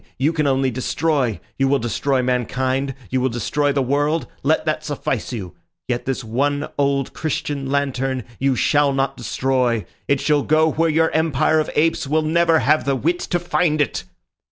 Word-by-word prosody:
You 145 +5 +1
can 155 -3 +1
only 135 -1 +2
destroy. 130 - 0 0.2
You 135 - +3
will 140 +1 +3
destroy 130 +2 0
mankind; 130 +2 -1 0.2
you 130 0 +1
will 130 - +1
destroy 140 +5 0
the 140 -1 +1
world. 145 +5 0 0.2
Let - - +1
that - - -1
suffice - - -3
you. 95 -7 -6 0.3
Yet 120 -1 -2
this 130 -1 -2
one 145 +6 -1
old 140 -1 +1
Christian 145 -3 -3
lantern 135 -2 -1 0.2
you 135 0 +2
shall 145 +3 +2
not 135 0 0
destroy. 125 -2 0 0.2
It 140 - +2
shall 150 0 +2
go 155 +2 +3
where 165 +2 +1
your 160 +1 +2
empire 155 0 +2
of 155 - -1
apes 160 -2 +1
will 155 +2 +1
never 165 +1 +3
have 150 +3 +2
the 140 -1 +1
wit 170 +7 0
to 175 - -1
find 175 -2 0
it." 145 - -1
140 Hz, 180 wpm, -21 LUFS, 130-155 Hz, 0.3 s, You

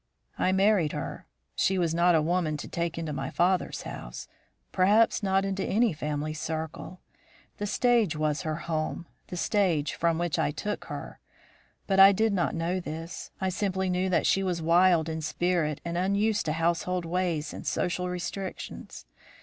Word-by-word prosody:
"I 185 - +2
married 190 -4 +3
her. - - -5 0.3
She 190 - +1
was 170 -3 +1
not 170 +1 +4
a 155 - +3
woman 165 -2 0
to - - -7
take 170 -1 -3
into 160 -2 -3
my 135 -1 -3
father's 180 +1 0
house; - - -7 0.4
perhaps 210 +6 +4
not 195 -1 +1
into 195 0 -2
any 225 -2 +2
family 150 0 -3
circle. 160 +3 -5 0.6
The 205 - -3
stage 230 -6 +2
was 150 0 0
her 155 -3 -2
home, 160 +1 -2 0.2
the 180 - -6
stage 175 -6 +1
from 165 -1 +1
which 170 -3 -1
I - - +2
took 210 +8 -4
her; - - -7 0.7
but 195 -1 +1
I 195 +1 +9
did 220 +2 +2
not 180 -3 0
know 170 +3 -1
this; 165 0 -6
I 190 -1 0
simply 190 0 -1
knew 180 +1 0
that 180 - +2
she 195 - +3
was 180 -3 -1
wild 170 0 +4
in 160 0 -3
spirit, 160 -2 0
and 170 +1 -2
unused 200 +1 +1
to 155 - +1
household 170 +2 0
ways 165 -3 -1
and - - -8
social 180 0 -1
restrictions. 185 +2 -6
175 Hz, 170 wpm, -28 LUFS, 160-190 Hz, 0.7 s, I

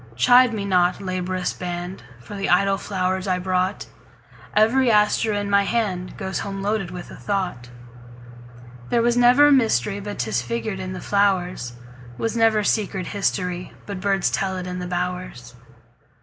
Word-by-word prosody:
Chide 245 - +6
me 210 -3 -3
not, 180 -2 +2
laborious 185 -1 -2
band, 175 +1 -5 0.2
For 120 - -11
the 195 0 -2
idle 195 +2 +3
flowers 185 -1 -2
I 185 -1 +1
brought; 185 +1 -1 0.7
Every 235 +4 +4
aster 210 0 +3
in 205 -1 -1
my 200 0 +3
handGoes 190 -3 -2
home 195 -1 -5
loaded 205 -3 -1
with 180 -1 -8
a - - -9
thought. 180 -12 -3 1.2
There 235 - +2
was 240 0 +2
never 250 +4 +6
mysteryBut 205 - +1
'tis 115 -1 -1
figured 120 - -4
in 185 0 -5
the 185 - -7
flowers; 185 -10 0 0.4
SWas 225 0 -2
never 225 -2 +3
secret 195 -3 0
historyBut 185 0 -3
birds 195 -1 +1
tell 190 -1 -1
it 185 - -5
in 180 0 -5
the 180 - -5
bowers. 180 -9 -4
190 Hz, 150 wpm, -22 LUFS, 180-210 Hz, 1.2 s, Chide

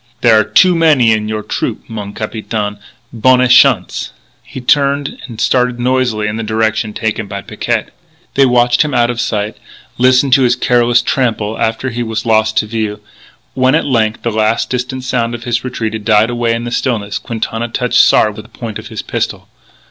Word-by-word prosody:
"There 115 -3 +5
are - - +3
too 185 - +4
many 155 -9 +4
in 105 -1 0
your 110 -1 -3
trupeau, - - -3
mon 105 -3 -7
capitaine. 105 -1 -4 0.3
Bonne 125 +2 +3
chance!" 125 -6 +3 0.3
He - - -9
turned 140 +2 +1
and 115 -4 -10
started 125 0 +1
noisily 125 -3 0
in 105 +1 -3
the 115 - -3
direction 110 0 -1
taken 110 0 -3
by 100 0 -6
Picquet. - - -3 0.4
They 135 -1 +4
watched 120 -1 +3
him 150 -3 0
out 120 0 +2
of 120 0 -3
sight; 105 0 -2 0.4
listened 130 +1 +4
to 135 - +5
his 125 -1 +3
careless 120 -1 +2
trample 110 -5 -1
after 115 +4 -1
he 120 +1 -4
was 110 -1 -3
lost 110 -1 +2
to - - +2
view. 110 -1 -3 0.5
When 130 0 +2
at - - +1
length 115 -5 0
the 115 - -1
last 110 +1 0
distant 130 +1 -3
sound 120 -2 -1
of 120 - -9
his 120 -1 -1
retreat 115 -4 -3
had 110 -1 -5
died 110 +2 +3
away 120 -1 0
in 115 - -4
the 120 - -5
stillness, 110 -5 -2
Quintana 115 0 -4
touched 125 +1 0
Sard 105 -1 +3
with 105 - -10
the - - -20
point 115 -3 -5
of - - -10
his - - -6
pistol. - - -4
115 Hz, 195 wpm, -14 LUFS, 110-125 Hz, 0.5 s, There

